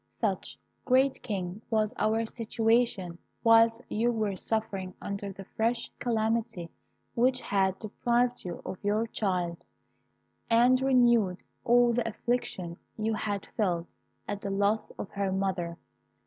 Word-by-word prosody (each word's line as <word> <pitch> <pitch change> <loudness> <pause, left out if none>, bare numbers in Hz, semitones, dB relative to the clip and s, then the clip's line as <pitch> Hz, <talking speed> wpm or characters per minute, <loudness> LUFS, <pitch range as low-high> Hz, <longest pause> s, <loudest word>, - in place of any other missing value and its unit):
"Such, - - -1 0.3
great 265 +1 +3
King, 195 -2 -4
was 215 0 +1
our 220 +1 +2
situation 225 -5 0 0.2
whilst 230 +1 +5
you 235 +3 +1
were 215 -4 -1
suffering 195 -3 -2
under 200 0 -4
the 195 0 -10
fresh 230 +4 -1
calamity 225 -6 -1 0.4
which 255 +2 +2
had 190 -4 +1
deprived 240 +3 0
you 175 -2 -6
of 185 +1 -6
your 210 +2 +1
child, 180 -6 -2 0.9
and 245 +3 +5
renewed 240 -8 +3 0.2
all 240 0 +5
the 240 0 0
affliction 200 -7 -2 0.2
you 220 0 0
had 205 -2 -2
felt 175 -5 -1 0.3
at 205 -1 -3
the 200 - -3
loss 200 +2 +1
of 195 - -6
her 200 -1 -1
mother. 185 -3 -1
215 Hz, 130 wpm, -29 LUFS, 195-235 Hz, 0.9 s, whilst